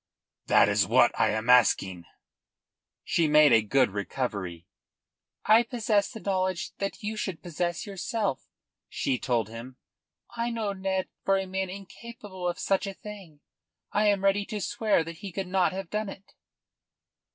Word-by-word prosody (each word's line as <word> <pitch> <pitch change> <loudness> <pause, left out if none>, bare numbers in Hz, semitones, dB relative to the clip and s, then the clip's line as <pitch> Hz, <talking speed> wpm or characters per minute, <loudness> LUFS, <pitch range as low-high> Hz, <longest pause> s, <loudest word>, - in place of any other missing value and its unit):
"That - - +6
is - - +2
what - - +5
I - - +2
am 110 +2 -2
asking." 95 -8 +4 1.0
She 165 - +1
made 150 -3 +6
a 115 - +6
good 125 +2 +2
recovery. 100 -4 -4 0.8
"I 220 +2 +7
possess 225 -4 0
the 225 - -9
knowledge 185 -3 -1
that 195 +3 -4
you 215 +1 -3
should 190 -5 -4
possess 175 0 -2
yourself," 205 - -3 0.4
she 130 -2 -1
told 115 -5 0
him. 120 +3 -9 0.6
"I 235 0 -1
know 220 -4 -2
Ned 190 -1 -2 0.2
for 195 0 +3
a 190 - -2
man 190 0 -3
incapable 200 -1 -8
of 175 - -4
such 195 +1 0
a 195 - -6
thing. 190 -9 -11 0.5
I 210 +1 +2
am 200 -2 +2
ready 195 +1 +3
to 215 -1 -5
swear 205 -1 +1
that 165 0 -8
he 195 +1 -7
could 195 +2 -3
not 185 -1 +2
have 190 -1 -6
done 210 -1 -2
it." 195 0 -12
190 Hz, 160 wpm, -27 LUFS, 135-205 Hz, 1.0 s, I